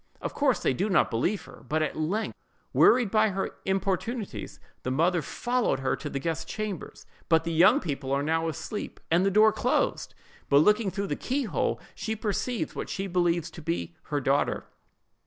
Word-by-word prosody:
Of - - -4
course, 275 -4 +2
they - - +3
do 195 +11 -1
not 175 -5 +3
believe 175 - 0
her; - - -14
but 155 +1 +1
at 155 - -2
length, 180 +8 -1 0.4
wearied 240 -5 +5
by 220 0 +4
her 195 0 -2
importunities, 195 +3 -2 0.2
the - - -3
mother 165 +6 +2
follows 245 - 0
her 130 - +1
to 150 - -5
the 140 - -3
guest's 160 +2 -3
chamber; 215 -4 -4 0.4
but 160 -1 +4
the 165 0 -2
young 170 +4 +6
people 140 -5 -4
are 140 +1 +1
now 165 +2 +1
asleep, 185 +6 -5
and 170 +3 +4
the 195 - +3
door 215 +2 +6
closed; 250 - 0 0.3
but 140 - +6
looking 210 +7 +4
through 200 +1 -3
the - - -2
keyhole, 260 -3 -1
she 220 -1 -3
perceives 220 +2 -2
what - - -5
she 195 - -3
believes 175 -3 +1
to 165 - -10
be 165 +1 -3
her 145 -2 -1
daughter. 140 +1 +1
180 Hz, 185 wpm, -27 LUFS, 160-215 Hz, 0.4 s, young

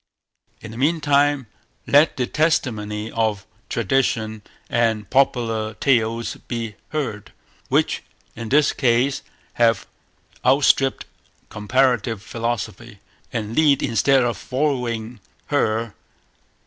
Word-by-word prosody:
In 115 - -9
the 115 - -8
meantime, 145 -2 +2 0.4
let 145 +3 +4
the 125 - +1
testimony 110 -9 -1
of 110 -3 -1 0.2
tradition 110 -2 0 0.3
and 115 -3 0
popular 115 -5 +1
tales 115 -3 0
be 115 -3 -4 0.2
heard, 105 -10 -4 0.4
which - - +1 0.3
in 115 -1 -6
this 150 +2 +4
case 125 +1 +1 0.4
have 115 -1 +3 0.6
outstripped 135 0 +3 0.4
comparative 115 -1 +1
philology, 115 -1 -4 0.3
and 110 -1 -4
lead 145 -3 +4
instead 135 +1 +3
of 120 -4 -1
following 125 -4 -2 0.3
her. 115 -5 +1
120 Hz, 95 wpm, -22 LUFS, 110-135 Hz, 0.6 s, let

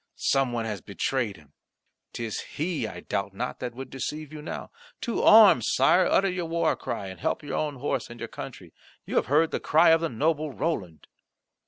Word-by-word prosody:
Some 135 -2 +1
one 115 -1 -2
has 105 -4 -4
betrayed 110 0 -2
him; 75 -2 -20 0.6
'tis 115 -3 -4 0.2
he, 155 -6 -1
I - - -8
doubt 100 0 -3
not, 125 +5 -4
that 120 -1 -5
would 130 0 -8
deceive 150 +3 -5
you 155 - -7
now. 150 - -6 0.3
To 235 - -1
arms, 210 - +7
Sire! 175 +7 +4
utter 195 - +3
your 180 -2 -2
war 165 -1 +1
cry, 100 - -5
and 95 -2 -8
help - - -1
your 145 - -4
own 145 -4 -3
house 130 -4 -2
and 120 0 -10
your - - -4
country. - - -9 0.3
You - - -2
have - - +2
heard 155 +4 +3
the - - -1
cry 160 +2 +5
of 165 0 +4
the 165 - 0
noble 150 +5 0
Roland." 95 - -3
135 Hz, 200 wpm, -26 LUFS, 115-160 Hz, 0.6 s, arms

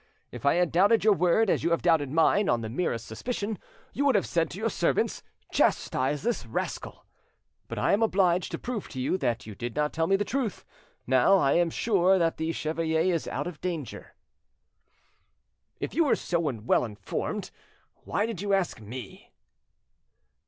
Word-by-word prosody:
If - - -4
I 140 - +5
had 175 -1 +2
doubted 200 +6 +4
your 215 -1 +6
word 180 +4 +3
as - - +1
you - - +2
have 170 - 0
doubted 160 -5 +3
mine 165 +7 +3
on 120 -1 +2
the 110 - -5
merest 125 -4 -2
suspicion, 210 - -4 0.3
you 285 - -1
would 280 -4 +3
have 200 - +2
said 165 -2 0
to - - -8
your 225 +1 -1
servants, - - 0 0.3
'Chastise 135 +3 +1
this 235 - -1
rascal.' 115 - -5 0.6
But - - -6
I - - +2
am 205 - +2
obliged 185 -5 +2
to - - -1
prove 240 -5 -5
to 130 - -7
you 130 +7 0
that 120 -3 -1
you 110 - -8
did 120 +3 -6
not 150 0 0
tell 160 0 0
me 195 - +4
the 205 +1 0
truth. 245 -6 -3 0.4
Now 130 +10 +4
I 140 -7 +2
am 175 -1 +3
sure 190 0 +2
that 165 -2 +1
the 160 +1 -1
chevalier 160 +2 0
is 165 - -2
out - - -3
of 175 -4 -7
danger." 165 -7 -5 1.6
"If - - -4
you 330 - +3
were 280 - +3
so 170 - -1
well 125 -10 +1
informed 105 -4 -4 0.5
why 205 - 0
did 225 -6 -5
you 200 -1 +2
ask 185 -11 -2
me?" 110 0 -9
170 Hz, 185 wpm, -27 LUFS, 140-200 Hz, 1.6 s, your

